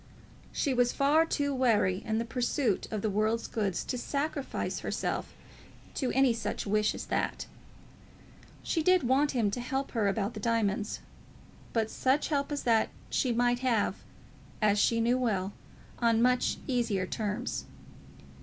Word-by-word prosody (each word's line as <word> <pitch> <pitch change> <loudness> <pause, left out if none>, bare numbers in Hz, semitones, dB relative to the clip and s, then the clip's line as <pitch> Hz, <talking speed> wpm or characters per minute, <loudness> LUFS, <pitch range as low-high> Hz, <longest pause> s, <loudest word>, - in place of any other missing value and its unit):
She 280 - 0
was 245 -1 +3
far 300 +4 +3
too 285 -3 0
wary 210 -8 +2
in 220 -1 -1
the 230 - -1
pursuit 240 -2 0
of 215 -2 -3
the 215 - +1
world's 215 +3 +1
goods 200 -5 -1
to 250 - -3
sacrifice 280 +1 -2
herself - - -3 0.6
to 260 - -1
any 265 -2 +4
such 230 - -3
wish 210 +1 +1
as - - -6
that. - - -1 1.2
She 330 - 0
did 365 0 +4
want 270 +4 +2
him 225 -5 +1
to 245 - -3
help 270 +3 -2
her 220 -4 +1
about 200 +2 -1
the - - -6
diamonds, 215 -2 0 0.7
but 220 -1 0
such 265 +3 +1
help 285 -1 0
as 290 - -2
that 225 -2 +3 0.2
she 255 - +1
might 245 +1 +2
have, 245 -5 +1 0.6
as 210 -1 +3
she 230 +3 +3
knew 240 +2 +2
well, 200 -5 0 0.5
on 230 -2 +3
much 250 +1 +2
easier 235 -7 0
terms. 210 +1 -3
235 Hz, 155 wpm, -30 LUFS, 215-260 Hz, 1.2 s, any